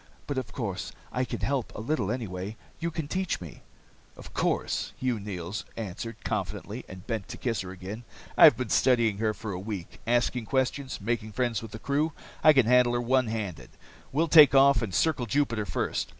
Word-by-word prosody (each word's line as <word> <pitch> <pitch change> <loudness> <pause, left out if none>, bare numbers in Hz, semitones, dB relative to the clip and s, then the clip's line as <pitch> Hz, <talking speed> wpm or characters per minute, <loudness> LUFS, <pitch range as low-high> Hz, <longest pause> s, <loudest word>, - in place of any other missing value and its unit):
"But 140 -2 -1
of 115 -4 -7
course, 110 -7 -4 0.2
I 125 - 0
can - - -5
help, 135 -4 -1
a - - -5
little 115 -3 -1
anyway. 105 -3 -4 0.2
You 170 - -1
can 160 -2 -4
teach 185 +3 -1
me." 85 -5 -10 0.6
"Of - - -12
course," - - -1
Hugh 125 -4 -1
Neils 95 -1 -5
answered 115 +2 -5
confidently, - - -3
and 95 -1 -10
bent 110 -5 -3
to - - -7
kiss 115 -5 -1
her 90 - -7
again. 95 +5 -7 0.3
"I've - - +8
been 125 -3 -3
studying 115 -5 +3
her 110 -1 0
for 110 - -6
a 90 - -4
week, 95 -3 -6
asking 120 0 +1
questions, 130 0 -1
making 110 0 -2
friends 120 -1 0
with 115 - -8
the - - -7
crew. 145 +6 0 0.3
I 155 - +9
can 135 -5 +4
handle 125 0 +5
her 120 - +1
one 130 +1 +2
handed. 105 -8 -4 0.4
We'll 160 +5 +2
take 150 -4 +8
off 135 0 +6
and 110 -4 -3
circle 130 - +1
Jupiter 115 -4 0
first. - - -2
115 Hz, 195 wpm, -28 LUFS, 105-130 Hz, 0.6 s, I